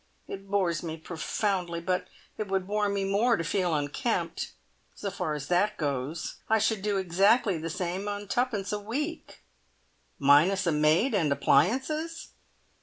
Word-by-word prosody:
It 195 0 -8
bores 185 -5 +1
me 160 -2 -5
profoundly, 175 +2 -2
but 180 +2 -1 0.3
it 215 - -4
would 190 -1 0
bore 205 +1 0
me 200 -1 -1
more 210 +4 +2
to - - -2
feel 175 0 0
unkempt. 150 - -2 0.4
So 200 - -4
far 180 -5 -2
as 140 -2 -6
that 180 +4 +2
goes, 145 +1 -3
I 220 - +5
should 220 -1 +1
do 205 0 0
exactly 195 +1 +3
the 165 +1 -4
same 180 +3 -3
on 205 0 -4
twopence 230 -4 -1
a 210 - -1
week!" 290 +11 -5 0.7
"Minus 155 +8 +4
a 170 - +2
maid 155 - +3
and 165 -8 +2
appliances?" 305 - +1
195 Hz, 155 wpm, -28 LUFS, 165-210 Hz, 0.7 s, I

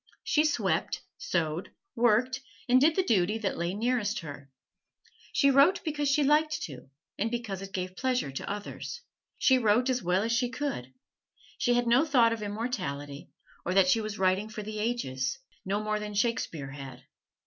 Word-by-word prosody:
She 305 0 +3
swept, 310 - 0 0.2
sewed, 170 - -1 0.3
worked, 245 +3 +2 0.3
and 255 +1 +5
did 315 +3 +5
the 380 - +2
duty 210 - +2
that 210 -3 -2
lay 170 +2 -2
nearest 230 -1 0
her. 140 -3 -9 0.8
She 280 -1 +4
wrote 280 +8 +5
because 295 -3 -1
she 290 +1 +3
liked 305 +2 +2
to, 135 -3 -8 0.3
and 220 +3 +1
because 225 -5 -4
it 195 0 -8
gave 185 0 -4
pleasure 255 - 0
to 135 - -5
others. 205 - -6 0.4
She 260 -1 +4
wrote 240 +3 +3
as 255 - 0
well 180 +3 +1
as 230 - -1
she 245 +1 +1
could. 250 - -4 0.7
She 245 -1 +3
had 245 0 +2
no 240 +5 +5
thought 245 -7 +4
of 225 - -5
immortality, 180 - -4 0.3
or 185 - -2
that 190 -2 +5
she 225 +4 +4
was 215 -1 -5
writing 190 +3 +1
for 215 -1 -6
the 215 0 -5
ages 135 - -1 0.3
no 200 +2 0
more 215 0 -1
than 210 0 -6
Shakespeare 185 - -1
had. 135 -2 -9
215 Hz, 175 wpm, -29 LUFS, 185-255 Hz, 0.8 s, and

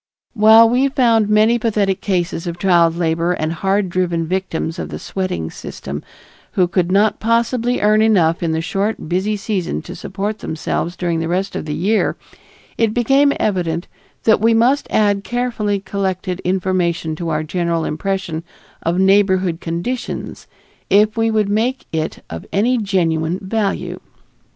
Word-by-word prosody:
While 220 0 +7
we 250 +4 +2
found 230 -6 +2
many 215 +3 +4
pathetic 205 -4 0
cases 175 -3 -1
of 170 0 -4
child 170 -3 +3
labor 170 +1 +1
and 155 -1 -2
hard 195 +3 0
driven 175 -2 0
victims 175 -2 -3
of - - -4
the - - -5
sweating 135 - -4
system 70 +2 -7 0.5
who 180 -2 +3
could 180 0 0
not 205 +2 +3
possibly 235 +2 +1
earn 215 +1 +4
enough 180 -7 +3
in 165 -2 0
the 160 0 0
short 195 +3 -2
busy 190 +5 0
season 200 -3 -3
to 180 - -8
support 200 +4 -4
themselves 165 +2 -3
during 170 -2 -1
the 165 - -2
rest 185 +3 -2
of - - -4
the 150 -1 -3
year, 210 +6 +1 0.6
it 220 -2 +1
became 270 +4 +4
evident 175 -4 -1 0.4
that 220 -2 +4
we 225 +1 +4
must 250 +5 +2
add 205 -2 +2
carefully 235 -4 -1
collected 190 -1 -3
information 180 -3 -1
to 170 0 -3
our 155 0 -1
general 170 0 -1
impression 170 0 -3 0.4
of 170 +2 -1
neighborhood 190 -3 +3
conditions 175 +10 -4 0.4
if 210 +2 +4
we 225 0 +1
would 215 -2 +1
make 230 +6 0
it 160 0 -3
of 80 0 -8
any 235 +5 +2
genuine 170 -5 0
value. 200 0 -2
190 Hz, 155 wpm, -18 LUFS, 170-215 Hz, 0.6 s, While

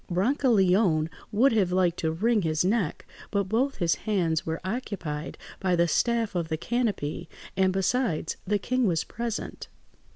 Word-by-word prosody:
Brancaleone 190 - +3 0.2
would 235 +6 +4
have 200 -6 +2
liked 180 -2 +2
to 160 - 0
wring 215 +6 +2
his 160 0 0
neck, 200 -4 0 0.2
but 200 -1 +1
both 235 +8 0
his 170 -2 +2 0.2
hands 170 -7 +1
were 160 0 -2
occupied 185 -8 -4 0.2
by 185 -2 +1
the 170 0 +3
staff 230 +3 +1
of 170 -3 -1
the 160 0 -2
canopy; 195 -8 -2 0.3
and 190 0 +3
besides, 195 -3 0
the 205 +1 +2
king 250 +3 0
was 165 -3 +1
present. 235 -1 -5
190 Hz, 155 wpm, -27 LUFS, 170-230 Hz, 0.3 s, would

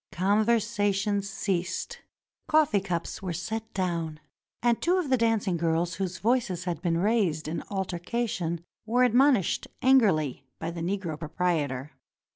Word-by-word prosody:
Conversation 205 0 +2
ceased; 195 - -3 0.5
coffee 305 -9 +4
cups 180 -3 -3
were 185 -3 -3
set 220 +6 -4
down, 170 -5 -2 0.4
and 240 -1 +2
two 355 +2 +3
of 325 -7 -1
the - - +6
dancing 225 -6 +1
girls 165 +1 0
whose 185 -1 -2
voices 225 -6 0
had 175 -3 -3
been 170 -2 +1
raised 185 -6 +1
in 160 +1 -3
altercation 180 -2 -2 0.2
were 245 +3 +3
admonished 250 - +3 0.2
angrily 190 - +3
by 165 +1 -4
the 170 0 -6
Negro 175 -3 -2
proprietor. 155 -5 -1
190 Hz, 130 wpm, -27 LUFS, 170-225 Hz, 0.5 s, the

